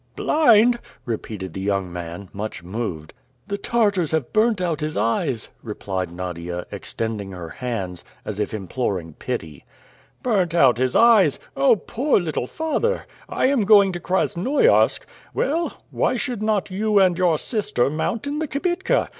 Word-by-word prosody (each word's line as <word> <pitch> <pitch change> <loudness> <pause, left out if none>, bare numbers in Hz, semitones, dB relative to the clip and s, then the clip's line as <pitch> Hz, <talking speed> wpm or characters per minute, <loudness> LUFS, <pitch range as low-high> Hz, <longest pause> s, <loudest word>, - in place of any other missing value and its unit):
"Blind!" 240 -5 +4 0.3
repeated 105 -6 -5
the 95 - -5
young 95 -2 -1
man, 85 +2 -6
much 100 -3 -5
moved. 90 -5 -5 0.3
"The 200 0 -3
Tartars 205 -8 +1
have 155 -6 -1
burnt 215 -1 +3
out 170 -4 -1
his 155 0 -3
eyes!" 115 - 0
replied 95 -5 -4
Nadia, 90 0 -5
extending 105 -4 -4
her 85 -2 -7
hands, 95 -6 -4 0.2
as 105 -1 -4
if 105 - -1
imploring 95 -5 -3
pity. 75 -4 -5 0.6
"Burnt 190 -9 +1
out 130 -7 +5
his 130 0 +1
eyes! 220 - +5 0.2
Oh! 135 +9 +5
poor 240 +7 +1
little 155 -8 -2
father! 320 - -1 0.2
I - - 0
am 270 -2 +3
going 200 -1 +6
to 175 - -5
Krasnoiarsk. 190 - +2 0.3
Well, 330 +5 0
why - - +1
should 245 -6 -3
not 215 -3 0
you 210 +2 +1
and 185 -3 +5
your 175 -3 +2
sister 205 - 0
mount 165 - -2
in 290 +1 -2
the 315 - -1
kibitka? 350 +7 0
160 Hz, 150 wpm, -22 LUFS, -, 0.6 s, going